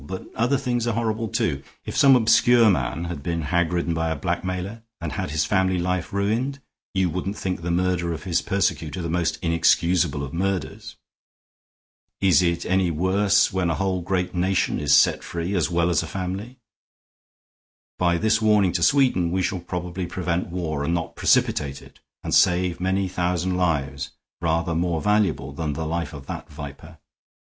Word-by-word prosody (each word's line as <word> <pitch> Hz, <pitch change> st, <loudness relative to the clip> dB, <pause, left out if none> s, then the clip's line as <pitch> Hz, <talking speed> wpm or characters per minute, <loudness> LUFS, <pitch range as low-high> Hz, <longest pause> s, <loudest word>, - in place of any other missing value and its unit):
But 95 Hz, +6 st, -8 dB
other 125 Hz, +5 st, +1 dB
things 120 Hz, -3 st, -1 dB
are 115 Hz, -, 0 dB
horrible, 115 Hz, 0 st, -1 dB
too. 75 Hz, -8 st, -1 dB, 0.2 s
If -, -, -6 dB
some 135 Hz, -1 st, +6 dB
obscure 115 Hz, -1 st, +5 dB
man 70 Hz, +1 st, -1 dB
had 85 Hz, -4 st, -5 dB
been 85 Hz, +2 st, -2 dB
hag 85 Hz, +2 st, +1 dB
ridden 85 Hz, -1 st, 0 dB
by 80 Hz, 0 st, -1 dB
a 80 Hz, -, -1 dB
blackmailer 90 Hz, +7 st, -3 dB, 0.2 s
and 85 Hz, -2 st, -4 dB
had -, -, -3 dB
his 75 Hz, +1 st, 0 dB
family 95 Hz, -2 st, +1 dB
life 90 Hz, 0 st, -2 dB
ruined, 115 Hz, +8 st, -1 dB, 0.4 s
you 95 Hz, -1 st, +2 dB
wouldn't 95 Hz, +4 st, -3 dB
think 90 Hz, -2 st, -3 dB
the 85 Hz, -, -4 dB
murder 90 Hz, 0 st, 0 dB
of 80 Hz, -2 st, -5 dB
his 90 Hz, -3 st, 0 dB
persecutor 90 Hz, -3 st, -1 dB
the 85 Hz, -, -3 dB
most 85 Hz, -1 st, 0 dB
inexcusable 85 Hz, -1 st, +2 dB
of 70 Hz, -, -7 dB
murders. 95 Hz, 0 st, -3 dB, 1.2 s
Is 95 Hz, -2 st, +4 dB
it 85 Hz, -1 st, 0 dB
any 95 Hz, -1 st, +2 dB
worse 95 Hz, +6 st, +2 dB
when 95 Hz, -2 st, 0 dB
a 85 Hz, -, 0 dB
whole 95 Hz, 0 st, -1 dB
great 90 Hz, 0 st, -1 dB
nation 95 Hz, +1 st, 0 dB
is 70 Hz, -1 st, +4 dB
set 75 Hz, -, +4 dB
free 85 Hz, +3 st, -4 dB
as 90 Hz, -4 st, +1 dB
well 85 Hz, 0 st, +1 dB
as 85 Hz, -, +2 dB
a 80 Hz, -, -6 dB
family? 95 Hz, -, -5 dB, 1.4 s
By 85 Hz, -1 st, +2 dB
this 110 Hz, +4 st, +2 dB
warning 105 Hz, -4 st, +4 dB
to -, -, -2 dB
Sweden 125 Hz, -11 st, +3 dB
we 95 Hz, +1 st, 0 dB
shall 95 Hz, +1 st, -1 dB
probably 90 Hz, +1 st, -4 dB
prevent 90 Hz, -1 st, -2 dB
war 80 Hz, -5 st, -3 dB
and 85 Hz, +4 st, 0 dB
not 85 Hz, -1 st, -4 dB
precipitate 70 Hz, -2 st, +1 dB
it, -, -, -17 dB, 0.2 s
and -, -, -3 dB
save 90 Hz, 0 st, +3 dB
many 95 Hz, +1 st, 0 dB
thousand 90 Hz, 0 st, -1 dB
lives 75 Hz, -6 st, -1 dB, 0.3 s
rather 85 Hz, 0 st, 0 dB
more 85 Hz, 0 st, 0 dB
valuable 85 Hz, -9 st, +1 dB
than 75 Hz, +1 st, -3 dB
the 80 Hz, +2 st, -4 dB
life 85 Hz, +2 st, -2 dB
of 70 Hz, -4 st, -10 dB
that -, -, -7 dB
viper. 75 Hz, +3 st, -10 dB
90 Hz, 175 wpm, -23 LUFS, 85-95 Hz, 1.4 s, some